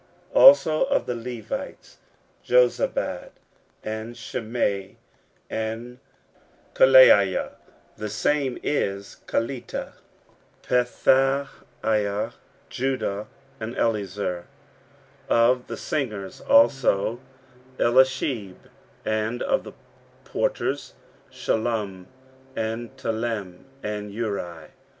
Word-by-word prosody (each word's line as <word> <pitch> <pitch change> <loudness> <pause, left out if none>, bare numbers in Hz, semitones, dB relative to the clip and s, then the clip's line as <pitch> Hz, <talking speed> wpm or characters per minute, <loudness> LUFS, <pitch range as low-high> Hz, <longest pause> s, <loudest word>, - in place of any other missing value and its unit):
15:010:023 - - +6
Also 215 - +7
of 280 +1 0
the 125 - -2
Levites; 115 -2 -7 0.5
Jozabad, 125 0 +1 0.5
and 110 +2 -5
Shimei, 110 -5 -3 0.5
and 115 +3 -5 0.7
Kelaiah, 130 -8 +6 0.5
(the 105 - -4
same 135 +4 0
is 100 -8 -2
Kelita,) 120 +2 -3 0.7
Pethahiah, 125 -5 +1 0.3
Judah, 125 -6 -2 0.3
and 115 +2 -6
Eliezer. 100 -5 -1 0.8
15:010:024 - - +3
Of 125 -1 -3
the - - -6
singers 105 -10 -4
also; 115 -2 +4 0.6
Eliashib: 125 -5 +2 0.5
and 110 +2 -1
of - - +1
the - - -10 0.5
porters; - - -2 0.4
Shallum, 105 -5 -2 0.5
and 115 +1 -4
Telem, 110 -5 -3 0.2
and 105 -1 -4
Uri. 100 -7 -4
115 Hz, 80 wpm, -24 LUFS, 105-125 Hz, 0.8 s, Also